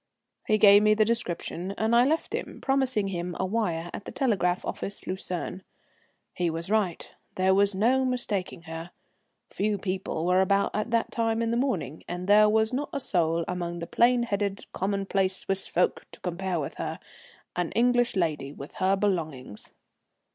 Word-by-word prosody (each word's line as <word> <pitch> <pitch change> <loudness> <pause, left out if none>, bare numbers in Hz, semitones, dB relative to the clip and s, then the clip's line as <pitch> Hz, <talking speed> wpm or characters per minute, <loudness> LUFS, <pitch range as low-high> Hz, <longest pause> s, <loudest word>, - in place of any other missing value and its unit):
He 215 - +4
gave 205 -1 +8
me 215 0 +4
the 215 0 +4
description, 195 -4 -3
and 220 +1 +2
I 240 +1 +6
left 315 +4 0
him, - - -4
promising 260 -7 +1
him 175 -1 -4
a 190 - +1
wire 180 -5 -1
at 205 - -7
the - - -6
telegraph 195 -9 0
office, 200 - -4
Lucerne. 185 0 -4 0.7
He 175 -1 0
was 165 +4 -4
right, 205 -6 0 0.3
there 190 0 +3
was 200 0 +3
no 245 +7 +3
mistaking 210 -9 -2
her. 165 +1 -7 0.6
Few 210 0 0
people 185 -4 -3
were 180 +1 +4
about 195 +1 +2
at 215 +2 -2
that 230 0 0
time 225 0 0
in 230 - 0
the - - +1
morning, 190 - -1
and 180 +1 -4
there 210 +2 +6
was 220 +2 +2
not 285 +3 -2
a 280 - -2
soul 170 -7 +1
among 175 -1 -3
the 170 - -4
plain 240 +5 +3
headed, 200 -3 -2
commonplace 195 -1 0
Swiss 195 0 -2
folk 180 - 0
to - - -12
compare 180 0 -2
with 140 - -5
her, - - -3 0.6
an 175 -1 -1
English 245 +1 +2
lady 155 -6 -1
with 140 0 -10
her 190 +1 +4
belongings. 160 - -3
195 Hz, 175 wpm, -27 LUFS, 175-220 Hz, 0.7 s, gave